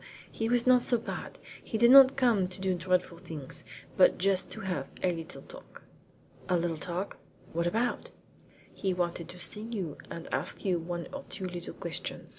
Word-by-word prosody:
He 225 0 -2
was 245 0 +3
not 255 -1 +6
so 240 - +2
bad. 230 - -6 0.3
He 220 - -3
did 235 +2 +6
not 270 0 +10
come 235 -8 +3
to 180 +1 -5
do 190 0 +1
dreadful 180 0 0
things, 160 -6 -7 0.3
but - - +6
just 190 0 +1
to - - -7
have 180 -8 -2 0.2
a 185 - +3
little 165 -1 -7
talk.'' - - -13 0.7
"A 180 - +4
little 170 -1 0
talk? 180 +4 -4 0.4
What 170 +1 +1
about?" 230 +7 0 0.6
"He 190 -2 -1
wanted 175 -1 -2
to 180 - -9
see 210 +4 -6
you, 210 -9 -4
and 165 - -7
ask - - -2
you 180 -3 +2
one 170 0 -4
or 280 0 -5
two 190 - -5
little 175 -1 -5
questions. - - -5
185 Hz, 185 wpm, -30 LUFS, 175-225 Hz, 0.7 s, not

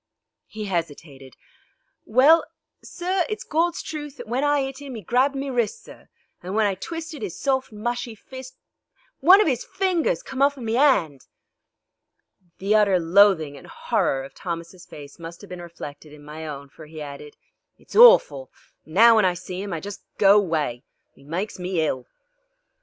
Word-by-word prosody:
He 215 0 -7
hesitated. 150 - -5 0.7
"Well, 275 +9 +5 0.4
sir, 365 +1 -2
it's 430 - -4
Gawd's 335 +2 -1
truth 295 -2 -7
that 245 -2 -9
when 250 +5 -1
I 290 -1 +2
'it 270 +1 -5
'im 270 -4 -7
'e 215 - -9
grabbed 255 +8 +1
me 275 0 -3
wrists, 245 - -1
sir, - - -15 0.3
and 185 +3 -6
when 220 -1 +3
I 200 - +1
twisted 320 - -7
'is 195 -5 -5
soft, 265 -3 -1
mushy 235 +2 -4
fist 260 +4 -11 0.6
one 360 +8 +7
of 425 - +3
'is 255 -5 0
fingers 385 +6 -1
come 265 - -6
off 285 0 +3
in 245 - -7
me 225 +1 -1
'and." 175 - +2 1.4
The 200 +2 0
utter 205 -4 +4
loathing 170 -3 +4
and - - -14
horror 135 0 -1
of 135 0 -11
Thomas' 170 0 -7
face 145 0 -12
must 170 0 -9
have 205 - -13
been 180 -1 -7
reflected 155 -3 -10
in 150 -1 -14
my 155 +1 -8
own, 140 -2 -8
for 155 +2 -14
he 155 0 -10
added: 145 0 -9 0.4
"It's - - -15
orful, - - +6 0.4
an' 155 - -13
now 230 +4 +7
when 215 - +4
I 180 -1 +1
see 185 +1 -7
'im 200 - -6
I 165 - -3
just 200 +3 -8 0.2
go 200 -1 +6
away. 155 -11 0 0.3
'E - - -20
maikes 180 +8 -5
me 180 +1 -4
hill." 150 -6 -1
205 Hz, 180 wpm, -23 LUFS, 165-270 Hz, 1.4 s, one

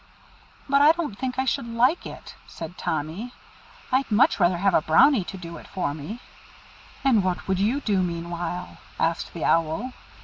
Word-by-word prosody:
'" - - -28
"But 280 0 +4
I 300 +2 +7
don't 330 -11 -4
think 250 +3 -4
I 265 - +1
should 235 -2 -1
like 245 +8 +2
it," - - -10
said 165 +2 -8
Tommy. 165 +12 -4 0.6
"I'd 260 0 +1
much 235 +7 +4
rather 175 -1 +3
have 195 +1 +2
a - - +4
Brownie 200 - +5
to 195 - -7
do 170 -2 -8
it - - -12
for 180 -7 -2
me." 160 +11 -7 0.8
"And 240 -7 +4
what 185 -1 -2
would 190 -1 0
you 230 +8 +1
do 205 -7 +1
meanwhile?" 175 0 -4 0.2
asked 165 +1 0
the 165 - -2
Owl. 165 +10 +1
195 Hz, 180 wpm, -25 LUFS, 170-250 Hz, 0.8 s, I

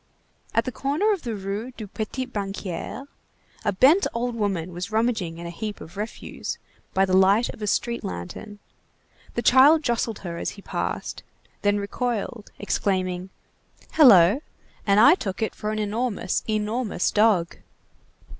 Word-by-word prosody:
At 230 - +3
the 255 - -2
corner 300 - +1
of 385 - -4
the 235 -3 -4
Rue 205 +5 -4
du 215 - -6
Petit 220 +5 -4
Banquier, 200 0 -5 0.6
a 205 - +1
bent 275 - +5
old 240 +1 -1
woman 190 -6 -2
was 180 +4 -5
rummaging 215 -7 0
in 170 - -8
a 170 - -5
heap 210 +4 -5
of 170 - -11
refuse 210 +3 -5 0.4
by 190 +1 +4
the 185 -1 +1
light 195 +5 +4
of - - -9
a 210 - -2
street 235 +3 0
lantern; 90 - -6 0.8
the 235 - -1
child 285 +5 +6
jostled 235 -3 0
her 170 -1 -4
as - - -2
he 200 - -12
passed, - - -4 0.4
then 205 0 +2
recoiled, 220 +1 -3
exclaiming:— 185 -2 -1 0.6
"Hello! 220 - +7 0.5
And 200 +1 +5
I 280 +8 +8
took 195 - -3
it 220 - -2
for 210 - -4
an 215 - -2
enormous, 215 -2 -1
enormous 215 -1 0
dog!" 205 -6 +3
210 Hz, 155 wpm, -24 LUFS, 190-240 Hz, 0.8 s, I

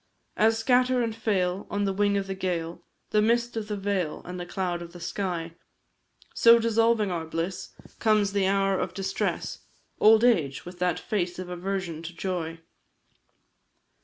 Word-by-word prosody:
As 225 +1 +3
scatter 250 +2 +3
and 225 -1 -2
fail, 195 -4 -1
on 205 0 -1
the 195 - 0
wing 205 +1 +2
of 200 - -1
the 195 - -4
gale, 175 -3 -3 0.3
The 210 - +4
mist 235 +2 +1
of 220 -2 -3
the 210 -1 -3
vale, 195 -5 -2
and 180 0 -6
the 175 - -6
cloud 175 -2 -2
of 170 0 -9
the 175 - -10
sky, 170 -2 -3 0.8
So, 235 0 +7
dissolving 230 -2 +2
our 165 -2 -3
bliss, 165 +3 -3 0.3
comes 215 -3 +3
the 200 -2 +2
hour 195 0 +2
of 185 - -3
distress, 195 0 -2 0.4
Old 220 +1 +6
age, 160 - +2
with 175 0 -10
that 180 -1 +1
face 180 -4 -2
of 185 -1 -6
aversion 180 -2 -3
to 170 +1 -8
joy. 165 -3 -4
195 Hz, 165 wpm, -27 LUFS, 175-215 Hz, 0.8 s, So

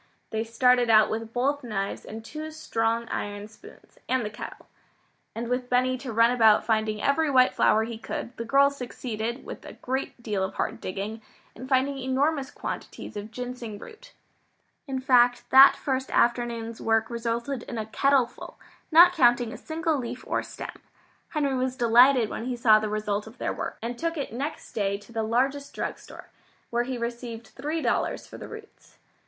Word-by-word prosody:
They 220 0 -1
started 245 +1 +3
out 215 -1 +6
with 225 0 -4
both 275 +4 0
knives 200 -4 -3
and 220 +1 -8
two 310 +4 -6
strong 230 -7 -1
iron 205 0 -4
spoons, 410 - -17
and 255 -3 +1
the 210 - -4
kettle. 210 - -9 0.7
And 230 +1 -4
with 250 +1 -2
Benny 255 +1 +2
to 255 -2 -6
run 230 +2 +4
about 220 -3 +5
finding 215 -1 0
every 295 +5 +2
white 255 -2 +5
flower 220 - +3
he 225 0 -6
could, 235 +1 -5
the 230 - -3
girls 280 +4 +3
succeeded, 235 -1 -5
with - - -8
a - - -9
great 260 -1 -4
deal 205 -4 -1
of 190 - -4
hard - - -2
digging, 205 +4 -5 0.3
in 255 +3 -9
finding 270 +1 +1
enormous 270 +2 0
quantities 230 - -7
of 205 +1 -6
ginseng 245 -2 -6
root. 450 - -13 0.7
In 265 -1 -2
fact 245 -1 +4
that 270 +1 +9
first 265 -1 -2
afternoon's 235 -1 0
work 225 +1 +1
resulted 235 +3 -2
in 240 - -7
a 220 - -2
kettle 270 +4 +3
full, - - -12 0.3
not 345 +3 +8
counting 240 -7 +3
a - - -7
single 320 -2 -2
leaf 245 0 -6
or - - 0
stem. - - -9 0.5
Henry 290 -3 0
was 255 0 -1
delighted 245 0 +5
when 225 - -5
he 250 -1 -2
saw 220 -3 +5
the 215 0 -3
result 210 0 -2
of 225 +3 -13
their - - -2
work, - - -5
and 235 +1 -4
took 335 0 -2
it 275 -5 -4
next 285 +6 -5
day 200 -2 0
to 205 +3 -17
the 225 -1 -2
largest 265 +6 0
drug - - -3
store, - - -13 0.4
where 240 0 +1
he 255 0 -3
received 235 -1 -5
three 305 +4 -4
dollars - - 0
for - - -11
the - - -8
roots. 440 -1 -13
240 Hz, 185 wpm, -26 LUFS, 225-270 Hz, 0.7 s, that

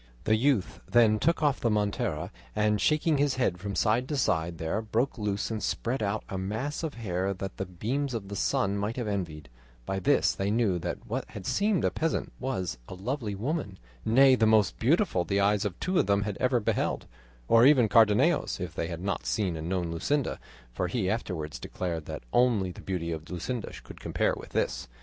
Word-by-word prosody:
The 110 - +3
youth 120 -4 +1
then 110 -3 +5
took 165 +3 +1
off 145 -2 +2
the 115 - +1
montera, 105 -4 -1 0.2
and 105 0 +2
shaking 155 0 +2
his 145 -2 +2
head 110 -9 0
from 100 +1 -4
side 120 +4 +2
to 150 - -1
side 85 -8 0
there 80 +7 -1
broke 115 +5 0
loose 105 +1 -1
and 110 -1 -3
spread 120 +5 -1
out 105 +1 -1
a 95 - -4
mass 110 +10 -3
of 160 -3 -4
hair 95 -3 -2
that 95 +1 -6
the 95 - -3
beams 125 +9 -2
of 100 -4 -4
the 100 - -6
sun 100 +1 +1
might 105 +3 -2
have 120 -3 -3
envied; 85 -7 -3 0.4
by 95 +6 -2
this 90 - +3
they 100 +1 -2
knew 105 -5 +2
that - - -5
what - - -3
had 95 - -8
seemed 205 - +1
a - - +2
peasant 165 +1 -1
was 95 - -3
a - - -7
lovely 110 +1 -3
woman, 115 - -3 0.3
nay 130 +4 +6
the 115 -3 +4
most 105 -4 +3
beautiful 150 - +2
the 100 +4 0
eyes 100 +1 +2
of 95 -4 -3
two 185 -1 +1
of - - +2
them 100 0 +3
had 105 -1 -3
ever 125 -1 +2
beheld, 105 - -1 0.4
or 115 0 +6
even 130 -4 +6
Cardenio's 105 -1 +4
if - - -4
they 80 - -2
had 85 +1 -6
not 100 - -2
seen 100 -6 0
and 80 +1 -5
known 90 -3 -1
Luscinda, 140 - -1 0.3
for 90 - -1
he 95 -2 0
afterwards 80 - -3
declared 85 +2 -4
that - - -6
only 115 -7 +3
the - - -11
beauty 85 -3 -3
of 80 +1 -6
Luscinda 105 +6 -4
could - - -12
compare - - 0
with - - -10
this. - - -1
105 Hz, 205 wpm, -28 LUFS, 95-125 Hz, 0.4 s, nay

